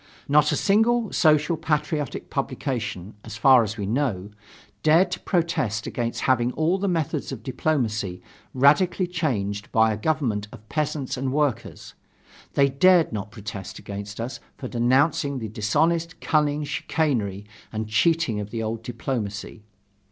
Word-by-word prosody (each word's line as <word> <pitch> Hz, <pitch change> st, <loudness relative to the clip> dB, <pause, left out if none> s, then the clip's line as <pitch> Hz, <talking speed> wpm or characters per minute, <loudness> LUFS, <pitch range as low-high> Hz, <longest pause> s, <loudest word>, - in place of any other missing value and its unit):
Not 150 Hz, +1 st, +4 dB
a -, -, +1 dB
single 225 Hz, +2 st, +2 dB
social 155 Hz, 0 st, +3 dB
patriotic 150 Hz, -3 st, -2 dB
publication, 110 Hz, -8 st, -3 dB
as 110 Hz, -1 st, -8 dB
far 130 Hz, +2 st, +6 dB
as 110 Hz, 0 st, -3 dB
we 100 Hz, -, -3 dB
know, 105 Hz, -4 st, -1 dB, 0.5 s
dared 165 Hz, +4 st, +4 dB
to -, -, -3 dB
protest 130 Hz, -, -1 dB
against 120 Hz, -1 st, -3 dB
having 125 Hz, -2 st, +2 dB
all 170 Hz, +5 st, +1 dB
the 200 Hz, -, -1 dB
methods 165 Hz, -7 st, -1 dB
of 120 Hz, -5 st, -7 dB
diplomacy 115 Hz, -9 st, -1 dB, 0.3 s
radically 170 Hz, +8 st, +3 dB
changed 115 Hz, -, -2 dB
by 110 Hz, 0 st, +4 dB
a -, -, -4 dB
government 115 Hz, -6 st, -1 dB
of 110 Hz, -, -13 dB
peasants 150 Hz, -4 st, -2 dB
and 130 Hz, 0 st, -2 dB
workers; 145 Hz, -3 st, -2 dB, 0.6 s
they 140 Hz, -, +5 dB
dared 165 Hz, +3 st, +4 dB
not 105 Hz, 0 st, -4 dB
protest 105 Hz, -3 st, -7 dB
against 100 Hz, +1 st, -7 dB
us 120 Hz, +4 st, -4 dB, 0.2 s
for 130 Hz, -, -6 dB
denouncing 135 Hz, +4 st, +2 dB
the 110 Hz, -3 st, -5 dB
dishonest 165 Hz, +11 st, 0 dB
cunning, 150 Hz, -1 st, +1 dB
chicanery 120 Hz, -10 st, -1 dB, 0.3 s
and 110 Hz, 0 st, -3 dB
cheating 120 Hz, 0 st, +2 dB
of 105 Hz, 0 st, -5 dB
the 115 Hz, 0 st, -3 dB
old 110 Hz, +1 st, -3 dB
diplomacy. 115 Hz, -3 st, -4 dB
130 Hz, 145 wpm, -24 LUFS, 110-155 Hz, 0.6 s, far